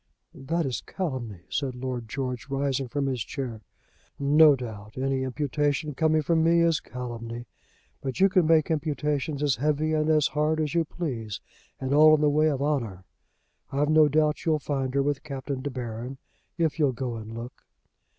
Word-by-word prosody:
"That 165 +5 -2
is 130 -3 -2
calumny," 130 - -4
said 135 -3 -2
Lord 125 -2 -4
George, 130 0 -4
rising 135 -1 -1
from 140 +3 -2
his 130 -4 -1
chair. 125 -6 -5 0.6
"No 145 +1 +6
doubt. 110 -4 -8
Any 135 0 0
imputation 145 +2 -1
coming 155 +2 +2
from 160 +1 +2
me 170 +1 +4
is 165 -2 +3
calumny. 120 -1 -6 0.6
But 130 -2 -4
you 195 - +7
can 185 -4 +3
make 160 -1 +4
imputations 150 -2 -1
as 140 -6 +2
heavy 150 +3 +1
and 155 0 +1
as 155 -2 +4
hard 155 +1 +1
as 150 -2 -1
you 170 -1 +2
please 120 - -4 0.4
and 130 +1 -1
all 155 +1 +8
in 150 - -1
the 150 -1 +4
way 155 +2 +3
of 140 -2 -1
honour. 115 -11 -1 0.7
I've 145 +2 +1
no 155 -1 +6
doubt 150 +1 +1
you'll 160 -2 +2
find 135 -3 -2
her 140 - +3
with 145 -1 -1
Captain 135 -2 -5
De 145 - -3
Baron 125 0 -5 0.4
if 160 -3 0
you'll 140 -4 +3
go 120 -1 -4
and 110 +1 -8
look." 120 +2 -8
140 Hz, 180 wpm, -27 LUFS, 125-155 Hz, 0.7 s, all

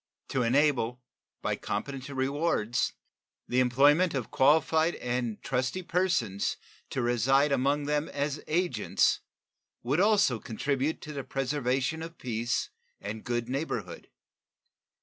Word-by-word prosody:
To 135 - 0
enable, 125 -1 +2 0.4
by - - 0
competent 135 0 -4
rewards, 130 -4 0 0.5
the 125 - +1
employment 145 +7 +4
of 125 -5 -3
qualified 160 +4 +3
and 120 -3 -2
trusty 130 +7 -1
persons 170 - 0 0.3
to 130 - -2
reside 135 +5 +3
among 140 +2 +1
them 150 +1 0
as 145 +1 -2
agents 155 - +1 0.6
would 135 +7 +1
also 200 - +4
contribute 140 +7 -2
to 150 - -7
the 140 -2 -4
preservation 135 +2 -1
of 165 +1 -8
peace 120 0 -2 0.3
and 105 +2 -6
good 120 -1 -2
neighborhood. 125 - -4
135 Hz, 115 wpm, -29 LUFS, 120-150 Hz, 0.6 s, employment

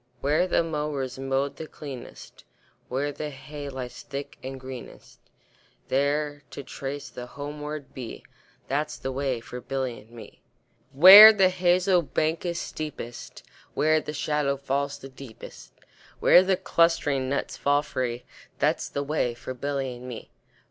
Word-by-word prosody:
Where 150 +6 +2
the 170 - +2
mowers 150 -5 -3
mow 135 +1 0
the 155 +2 -9
cleanest, 135 -6 -10 0.5
Where 140 +3 -1
the 150 +1 -5
hay 145 +1 -8
lies 125 -2 -7
thick 140 0 -7
and 130 0 -7
greenest, 130 -1 -10 0.7
There 145 +2 0
to 140 - -8
trace 140 +2 -6
the 125 0 -8
homeward 150 +1 -7
bee, 125 -3 -8 0.4
That's 150 +3 -2
the 135 - -4
way 130 -3 -2
for 125 +2 -8
Billy 130 -1 -3
and 110 - -19
me. 115 -3 -13 0.5
Where 190 +10 +12
the 195 -4 +4
hazel 180 0 +3
bank 160 +2 -1
is 170 0 -2
steepest, 130 -6 -7 0.3
Where 155 +1 +3
the 150 - -6
shadow 150 -2 -1
falls 140 +1 -2
the 135 - -10
deepest, 130 -3 -12 0.5
Where 180 - +7
the 190 0 +1
clustering 165 -8 +1
nuts 140 - -2
fall 145 +1 +2
free, 125 -4 -3 0.3
That's - - 0
the 140 - -3
way 140 -5 -1
for 130 - -7
Billy 135 0 -3
and 125 +1 -10
me. 120 -3 -8
140 Hz, 150 wpm, -26 LUFS, 130-155 Hz, 0.7 s, Where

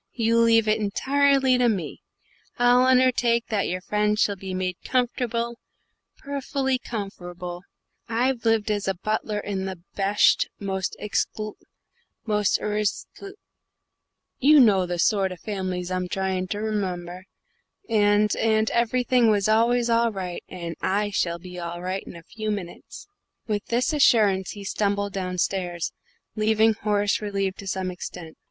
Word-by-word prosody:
"You 230 -1 +2
leave 225 -1 +4
it 215 +1 +2
entirely 270 +4 +2
to 245 -1 +4
me. 185 -8 -3 0.6
I'll 245 +1 +5
unnertake 250 -2 +3
that 210 -3 0
your 185 +1 -3
friends 210 +2 0
shall 205 - +2
be 190 -1 -6
made 185 -1 -2
comforrable, 235 -1 -1 0.6
perfelly 275 -2 -2
comforrable. 180 -6 -6 0.5
I've 245 +1 0
lived 225 -2 +2
as 205 -2 -1
butler 215 0 -1
in 200 -2 -3
the 190 -1 -5 0.2
besht, 200 +1 +3
the 200 - -9
mosht 190 -1 -2
ecxlu 215 0 -2 0.7
most 210 -2 +2
arishto 210 - -3 1.1
you 295 +3 +6
know 200 -7 +5
the 175 0 -3
sort 195 +1 +2
o' - - -8
fam'lies 185 -2 -4
I'm 185 0 -1
tryin' 190 0 -2
to 205 - -3
r'member 185 -4 -3 0.6
and 210 -1 +3
and 220 -1 +2
everything 240 0 +2
was 205 -2 +2
always 235 +2 +3
all 230 0 +2
ri', 185 -3 -5
and 170 -2 -6
I 205 +2 0
shall 170 -3 0
be 180 +1 -9
all 170 0 -5
ri' 185 +2 -3
in - - -9
a 170 - -11
few 215 +4 -5
minutes." 205 - -6 0.4
With 210 -2 -2
this 245 +6 0
assurance 210 -9 +3
he 205 - -9
stumbled 200 0 -1
downstairs, 180 -2 -2 0.4
leaving 220 +1 +3
Horace 205 -1 0
relieved 195 -2 -2
to 195 - -8
some 185 0 -2
extent. 175 -2 -8
210 Hz, 145 wpm, -24 LUFS, 185-230 Hz, 1.1 s, you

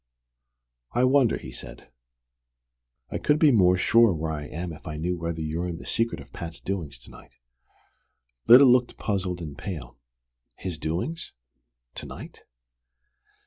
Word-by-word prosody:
"I 120 - +2
wonder?" 130 -2 +4
he 65 - -9
said. 60 - -10 1.2
"I - - -2
could 150 - +2
be 155 -2 +5
more 90 -6 +4
sure 115 +1 +4
where 80 0 -3
I 75 -1 -5
am 85 +1 -5
if 75 - -12
I 75 - -5
knew 90 +3 -1
whether 85 -1 -4
you're 80 +3 -2
in 85 -2 -4
the - - -11
secret 115 0 -1
of 70 -1 -14
Pat's 85 0 -7
doings 85 -9 -4
to - - -12
night." - - -16 1.1
Lyda 125 +4 +10
looked 125 -1 +3
puzzled 95 -4 -2
and 75 -3 -7
pale. 70 -10 -7 0.6
"His 90 -4 -5
doings 90 - -3 0.6
to - - -8
night? - - -11
90 Hz, 150 wpm, -26 LUFS, 80-115 Hz, 1.2 s, Lyda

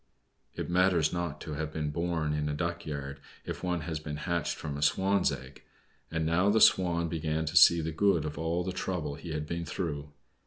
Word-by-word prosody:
It - - -4
matters 90 -3 +3
not 85 -4 -3
to 75 - -5
have 75 +1 -3
been 75 -1 -2
born 80 -1 -1
in 75 0 -1
a 75 - -2
duck 85 +1 -3
yard, 70 -2 -5 0.3
if - - -6
one 90 -2 -1
has 80 -1 -4
been 75 -1 -5
hatched 85 +2 -1
from 75 -1 -5
a 70 - -5
Swan's 95 +6 +3
egg. 65 0 -8 0.5
And 80 -1 -1
now 85 +5 +3
the 110 +2 +4
Swan 85 -4 +4
began 80 -1 -2
to 80 +3 -4
see 85 -1 +8
the 80 +1 -3
good 85 -1 +2
of 75 0 -4
all 80 +3 -1
the 95 - -3
trouble 90 -5 -3
he 75 +4 -9
had 75 -1 -3
been 85 +2 -3
through. 75 -5 -4
80 Hz, 210 wpm, -30 LUFS, 75-85 Hz, 0.5 s, see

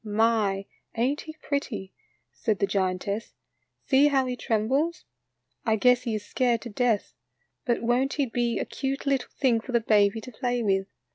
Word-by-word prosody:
"My, 210 -2 +1 0.3
ain't 265 +6 +1
he 315 - -9
pretty?" 215 -10 -3 0.4
said 215 -3 -1
the 200 - +2
giantess; 195 +2 -2 0.2
" - - -48
see 275 +2 +5
how 270 -2 +2
he 250 -1 -2
trembles. 265 +9 0 0.6
I 220 - +2
guess 250 +3 +4
he 230 -2 -1
is 210 - -5
scared 240 -3 +1
to 240 - -7
death. 230 -1 0 0.5
But 240 -1 0
won't 250 +4 +2
he 285 - +1
be 240 -1 -1
a - - -1
cute 270 +1 -3
little 275 -2 0
thing 245 -5 +3
for 245 +3 -8
the 235 - +5
baby 210 -1 +3
to 255 - -9
play 245 0 -1
with? 195 -2 +1
235 Hz, 180 wpm, -27 LUFS, 210-260 Hz, 0.6 s, see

